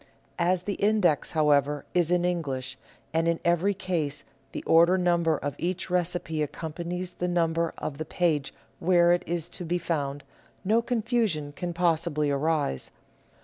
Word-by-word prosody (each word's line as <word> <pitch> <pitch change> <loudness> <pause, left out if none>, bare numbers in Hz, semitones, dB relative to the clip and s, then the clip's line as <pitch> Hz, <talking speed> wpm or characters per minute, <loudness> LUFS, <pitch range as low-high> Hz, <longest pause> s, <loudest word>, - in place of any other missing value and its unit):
As 175 +1 +2
the 200 - -2
index, 200 -8 +2
how 155 -2 +3
ever, 145 +1 +2
is 175 -2 +2
in 180 0 +2
English, 140 -8 -2 0.4
and 165 +1 +1
in 170 -1 +1
every 175 +4 +2
case 170 -7 -2 0.3
the - - -6
order 170 +3 +5
number 170 -3 +2
of 145 - -3
each 180 +1 -2
recipe 175 -3 -1
accompanies 170 +4 -4
the 180 - -2
number 170 -1 +1
of 145 -1 -5
the 155 - -3
page 155 -5 0 0.3
where 175 0 +4
it 175 - +1
is 170 -1 -2
to 180 - -5
be 175 +1 0
found, 145 -5 -2 0.4
no 220 +4 +3
confusion 225 - 0
can 175 +4 -4
possibly 165 -3 +1
arise. 145 - 0
170 Hz, 155 wpm, -27 LUFS, 155-180 Hz, 0.4 s, order